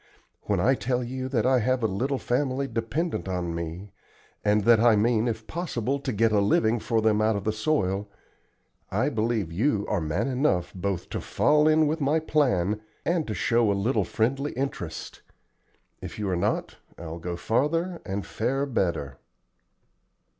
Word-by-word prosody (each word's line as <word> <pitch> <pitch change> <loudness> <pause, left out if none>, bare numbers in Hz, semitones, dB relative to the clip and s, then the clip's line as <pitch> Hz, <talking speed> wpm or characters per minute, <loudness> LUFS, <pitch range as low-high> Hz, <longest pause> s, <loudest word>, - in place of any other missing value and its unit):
When 100 -3 +1
I 130 +9 +4
tell 125 -1 -1
you 130 +2 -4
that 120 -5 0
I 130 0 +4
have 125 +1 0
a - - +3
little 125 +7 -1
family 130 +2 -1
dependent 120 - -2
on 90 -2 -2
me, 85 +4 -5 0.5
and 105 0 +3
that 115 +1 +6
I 115 -1 +5
mean 110 +2 +2
if 115 - -3
possible 140 -6 -2
to 135 -1 -3
get 115 0 +2
a 105 - +3
living 110 +3 +2
for 115 0 0
them 110 -1 +3
out 110 0 +2
of 100 - -3
the 110 - +1
soil, 105 -4 0 0.8
I - - +1
believe 110 -5 -1
you 105 - +1
are 105 -5 0
man 85 - -1
enough 130 - +1
both 95 -1 -3
to - - -3
fall 150 +1 +3
in 155 0 +5
with 155 +2 -1
my 145 +3 +2
plan 110 - +1 0.2
and 170 -2 0
to 110 - -3
show 115 +3 +2
a 100 - 0
little 115 +7 +1
friendly 135 +6 -1
interest. 125 - -5 0.8
If - - -7
you 105 -2 -2
are - - +1
not, 85 - -1 0.2
I'll 85 0 -7
go 85 +1 -4
farther 165 - 0
and 100 0 -4
fare 135 +5 -1
better." 85 - -2
115 Hz, 175 wpm, -26 LUFS, 100-135 Hz, 0.8 s, that